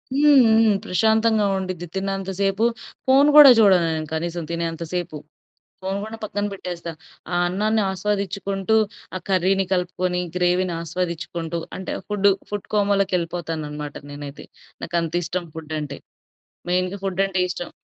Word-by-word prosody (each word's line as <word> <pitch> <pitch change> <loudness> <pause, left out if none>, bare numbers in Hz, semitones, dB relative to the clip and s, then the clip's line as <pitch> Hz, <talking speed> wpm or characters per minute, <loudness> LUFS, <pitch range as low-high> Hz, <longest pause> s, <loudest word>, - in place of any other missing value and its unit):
హ్మ్, 290 -1 +6 0.2
హ్మ్. 220 -2 +4
ప్రశాంతంగా 220 +3 +2
ఉండిద్ది. 185 -2 -4
తిన్నంత 195 0 -2
సేపు 195 +3 +2 0.4
ఫోన్ 275 +3 +6
గూడా 295 -2 +11
జూడను 190 -5 +5
నేను 155 -1 -3
కనీసం 170 +1 -3
తినేంత 170 0 -3
సేపు. 175 -3 -3 0.7
ఫోన్ 190 +1 -2
గూడా 220 +1 -6
పక్కన 205 -1 -3
పెట్టేస్తా. 175 -3 -6 0.4
ఆ - - 0
అన్నాన్ని 215 +4 +1
ఆస్వాదిచ్చుకుంటూ, 200 +1 -1 0.4
ఆ - - -1
కర్రీని 190 +1 +2
కలుపుకొని, 180 0 0 0.2
గ్రేవీని 180 0 +1
ఆస్వాదిచ్చుకుంటూ 170 0 -3 0.2
అంటే, 190 - -4
ఫుడ్డు 200 -1 +3 0.2
ఫుడ్ 205 -1 -4
కోమాలోకెళ్ళిపోతాననమాట 170 -7 -1 0.2
నేనైతే. 145 0 -9 0.4
నాకంతిష్టం 170 +1 -2
ఫుడ్డంటే. 155 -3 -5 0.7
మెయిన్‌గా 185 +2 0
ఫుడ్డంటే 190 0 0
ఇష్టం. 175 - -5
185 Hz, 120 wpm, -22 LUFS, 170-200 Hz, 0.7 s, గూడా